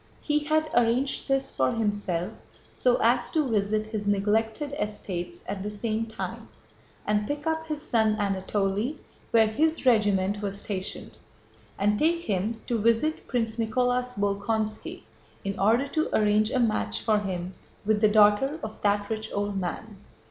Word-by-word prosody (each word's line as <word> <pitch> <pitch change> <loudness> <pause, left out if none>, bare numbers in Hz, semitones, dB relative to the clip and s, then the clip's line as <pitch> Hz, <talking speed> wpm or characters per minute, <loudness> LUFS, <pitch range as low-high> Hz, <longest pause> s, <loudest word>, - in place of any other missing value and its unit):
He 300 0 +2
had 310 +1 +2
arranged 240 +3 +1
this 270 0 0
for 130 -1 +2
himself 205 -6 -1 0.4
so 250 -1 +3
as 240 +2 +3
to 310 -4 +2
visit 215 -1 +1
his 215 -2 -4
neglected 220 +7 +1
estates 180 -4 -4
at 195 0 -4
the 205 - -3
same 220 +1 -2
time 220 - -6 0.6
and 210 0 +1
pick 290 +1 -3
up 320 0 -1
his 305 -1 -4
son 220 -2 +2
Anatole 200 +4 -1 0.3
where 225 -1 +5
his 310 +9 0
regiment 205 -4 +3
was 200 -1 -3
stationed, 190 -2 -5 0.7
and 205 +1 +2
take 335 +2 +2
him 215 - -1
to 235 -2 0
visit 230 +8 +1
Prince 230 -2 -1
Nicholas 250 +2 0
Bolkónski 215 - -2 0.4
in 195 0 -3
order 230 +7 +3
to 315 +2 0
arrange 210 0 +3
a 255 - 0
match 230 -3 0
for 215 -2 +2
him 185 -2 -4 0.3
with 215 0 +2
the 215 - +6
daughter 210 +7 +4
of 215 0 -7
that 205 0 +1
rich 220 0 -4
old 205 0 -2
man. 200 +3 -5
215 Hz, 155 wpm, -27 LUFS, 205-245 Hz, 0.7 s, the